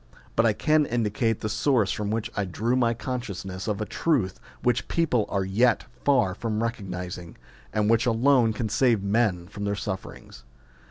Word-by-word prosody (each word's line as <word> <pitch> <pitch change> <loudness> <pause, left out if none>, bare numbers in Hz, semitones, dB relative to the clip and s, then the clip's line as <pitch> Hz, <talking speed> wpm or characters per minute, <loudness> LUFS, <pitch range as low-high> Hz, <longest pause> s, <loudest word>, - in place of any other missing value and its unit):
But 115 +1 +4
I 110 - +3
can 155 +5 +2
indicate 115 -1 0
the - - -1
source 110 -3 +2
from 105 +1 -2
which 110 0 -2
I 100 - 0
drew 110 +6 -1
my 120 -2 +2
consciousness 100 -7 -5
of 105 -2 -1
a 110 - -2
truth 120 - 0 0.2
which 120 -1 +1
people 135 -10 +1
are 100 -1 0
yet 110 +5 +2 0.2
far 120 -10 +3
from 110 +2 -3
recog 115 -4 -3
nising, 90 -1 -6 0.4
and 105 -1 +1
which 115 +3 +3
alone 120 0 +4
can 110 +1 -2
save 115 -2 +2
men 100 -4 +1
from 100 +1 -7
their 100 0 0
sufferings. 95 -2 -7
110 Hz, 175 wpm, -26 LUFS, 100-120 Hz, 0.4 s, But